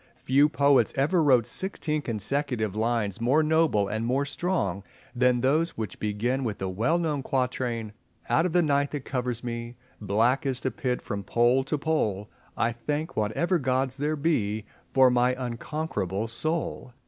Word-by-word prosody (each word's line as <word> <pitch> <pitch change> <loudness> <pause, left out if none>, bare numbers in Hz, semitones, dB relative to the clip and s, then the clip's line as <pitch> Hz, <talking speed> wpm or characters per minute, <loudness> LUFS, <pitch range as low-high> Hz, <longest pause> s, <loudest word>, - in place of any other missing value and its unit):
Few 140 +3 +4
poets 140 -2 +3
ever 155 +6 +2
wrote 130 -6 +4
sixteen 155 +2 -1
consecutive 115 -2 -2
lines 110 -2 -1
more 135 +7 +3
noble 155 -10 +2
and 110 +2 -2
more 130 +4 +1
strong 140 - -2 0.3
than 125 0 +3
those 155 +6 +1
which 110 -4 -5
begin 115 +6 -1
with 110 -4 -2
the 95 - -3
well 115 - +1
known 155 -5 -1
quatrain— 125 -4 -2 0.3
"Out 165 - +3
of - - -4
the 175 +1 +3
night 140 -2 +2
that 145 -3 -4
covers 125 -2 -3
me, 120 0 -5 0.3
Black 110 +6 +2
as 130 -2 -2
the 130 - -1
pit 130 -5 -2
from 100 0 -4
Pole 120 +5 +3
to 150 +2 -1
Pole, 110 -10 -1 0.3
I 120 - +1
thank 145 +7 -3
whatever 165 - +1
Gods 130 0 0
there 150 +2 0
be 110 -9 0 0.3
For 130 -1 +5
my 125 +1 +3
unconquerable 115 - -3
soul." 155 +1 -3
125 Hz, 160 wpm, -27 LUFS, 115-145 Hz, 0.3 s, For